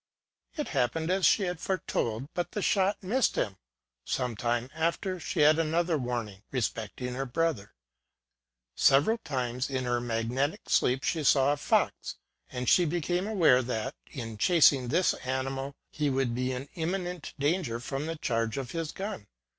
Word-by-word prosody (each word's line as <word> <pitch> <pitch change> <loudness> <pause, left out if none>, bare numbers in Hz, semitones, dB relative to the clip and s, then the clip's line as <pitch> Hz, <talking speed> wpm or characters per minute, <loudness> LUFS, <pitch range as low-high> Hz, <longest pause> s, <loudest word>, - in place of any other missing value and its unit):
It 300 - -2
happened 150 +5 0
as 190 0 +4
she 205 - +4
had 180 -3 -2
foretold; 130 - -2
but 175 - -3
the 210 - -2
shot 195 +1 +2
missed 235 +7 +1
him. 95 -3 -1 0.5
Some 125 - -2
time 120 +3 -1
after 170 +3 -1
she 165 0 -2
had 155 +2 +6
another 165 +1 +1
warning 120 -7 -3
respecting 125 0 -3
her 135 +2 -3
brother: 125 -7 -1 1.0
several 155 +13 +4
times 125 - -2
in 130 -1 -1
her 120 -1 0
magnetic 120 +5 -1
sleep 130 +2 +3
she 160 -3 0
saw 140 0 +4
a - - -3
fox, 145 - 0 0.4
and 125 -1 -4
she 175 - +5
became 175 +3 -1
aware 165 -12 +4
that, 125 +2 -3 0.2
in 115 -6 -7
chasing 145 - +5
this 170 +9 +3
animal, 135 +1 -3 0.2
he 150 -1 0
would 130 -3 0
be 130 +2 -1
in 130 +2 -5
imminent 180 0 -3
danger 145 -4 0
from 135 +4 -4
the 165 - -3
charge 115 -5 -1
of 130 -2 -4
his 165 -2 -3
gun. 195 - -6
135 Hz, 160 wpm, -29 LUFS, 125-170 Hz, 1.0 s, had